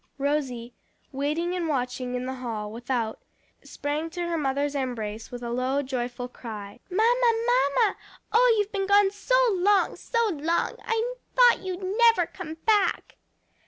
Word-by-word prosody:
Rosie, 270 -4 -2 0.4
waiting 300 +6 -1
and 355 -2 -2
watching 250 -3 -2
in 250 0 -3
the 260 - -3
hall 225 -5 -5
without, 235 -1 -3 0.4
sprang 300 +3 -3
to 350 +1 -4
her 340 - -1
mother's 285 -1 0
embrace 230 -6 -4
with 245 0 -8
a 235 - -4
low, 260 +3 0
joyful 245 -2 -4
cry, 215 -3 -9
"Mamma, 465 +5 +3
mamma! 455 - +3 0.4
oh, 480 +1 +6
you've 415 0 0
been 390 -2 -1
gone 400 -1 +5
so 410 +5 0 0.2
long, 390 +1 +2
so 465 -1 0
long! 330 0 -1
I 455 +2 -1 0.2
thought - - +6
you'd 375 0 -5
never 420 -1 +4
come 325 -2 -8
back." 415 -4 +1
300 Hz, 150 wpm, -26 LUFS, 250-400 Hz, 0.4 s, oh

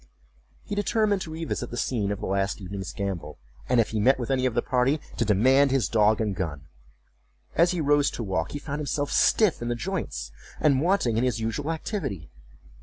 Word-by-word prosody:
He - - -6
determined 205 -1 +1
to 160 - -6
revisit 160 -6 -4
the 120 - -6
scene 110 -4 -1
of 105 - -4
the - - -3
last 100 +2 -1
evening's 95 -2 -6
gambol, 85 -5 -4 0.3
and 125 -1 +4
if 115 - +2
he 110 - -1
met 130 +6 +4
with 125 0 -3
any 130 -1 +2
of 120 - -3
the 120 - +1
party, 130 +4 +1 0.2
to - - +2
demand 130 +7 +4
his 135 -2 +1
dog 110 -1 +3
and 105 -3 -1
gun. 80 -6 -4 0.9
As 170 +2 +5
he 180 -2 -1
rose 145 -1 +3
to 120 - -3
walk, 95 -6 -2
he - - -2
found 145 0 -5
himself 145 0 -2
stiff 215 - +3
in 120 - -3
the 120 - 0
joints, 120 - -4 0.3
and 140 -4 +3
wanting 165 - +2
in 115 - +2
his 125 -2 0
usual 115 +7 -2
activity. 150 - -4
125 Hz, 205 wpm, -26 LUFS, 105-150 Hz, 0.9 s, As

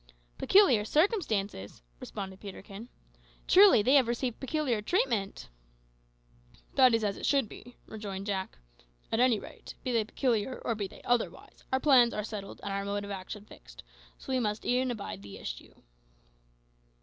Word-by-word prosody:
"Peculiar 370 - +5
circumstances!" 215 - 0 0.2
responded 190 -2 -7
Peterkin. 200 +3 -10 0.6
"Truly 380 - +7
they 260 - +3
have 270 -4 +5
received 240 0 -2
peculiar 265 -5 -1
treatment!" 225 - -1 1.3
"That 255 -3 +6
is 225 - -1
as 200 -2 -1
it - - -5
should 275 -5 +2
be," 245 +3 -13
rejoined 200 -3 -6
Jack; 190 - -3 0.5
"at 225 - +1
any 245 -3 +4
rate, - - -11
be 255 - -2
they 230 -2 +2
peculiar 235 +1 -1
or 230 - +1
be 205 -3 -3
they - - -15
otherwise, 245 -2 -2
our 260 - +2
plans 255 -5 +5
are 210 - -2
settled 205 -2 -7
and 200 - -3
our 200 0 -2
mode 200 0 -3
of 200 - -7
action 200 +2 -7
fixed, - - -14 0.3
so 265 - -6
we 260 - +2
must 210 -2 -2
e'en 255 +1 +1
abide 200 - -5
the 100 -1 -10
issue." - - -8
220 Hz, 160 wpm, -30 LUFS, 200-255 Hz, 1.3 s, Truly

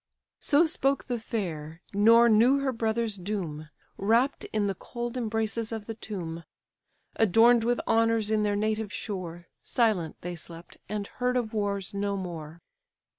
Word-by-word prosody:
So 300 +4 +4
spoke 275 -4 +1
the 245 -3 -3
fair, 170 -8 -5
nor 230 +4 +6
knew 235 +5 +5
her 275 -1 0
brothers' 225 -2 -1
doom; 175 -6 -4 0.3
Wrapt 230 +7 +2
in 215 -1 -1
the 200 - 0
cold 240 +4 -6
embraces 225 -1 -1
of 220 -2 -5
the 225 - -5
tomb; 175 -7 -6 0.7
Adorn'd 225 +3 +5
with 240 +1 +1
honours 225 -1 +2
in 215 -1 +2
their 205 -1 +1
native 215 0 -1
shore, 175 -5 -5 0.2
Silent 210 -9 +1
they 175 0 -5
slept, 170 +1 -11
and 210 -1 -2
heard 250 +4 -1
of 225 -3 -2
wars 200 -3 -2
no 200 0 -1
more. 170 -3 -7
215 Hz, 150 wpm, -28 LUFS, 185-230 Hz, 0.7 s, nor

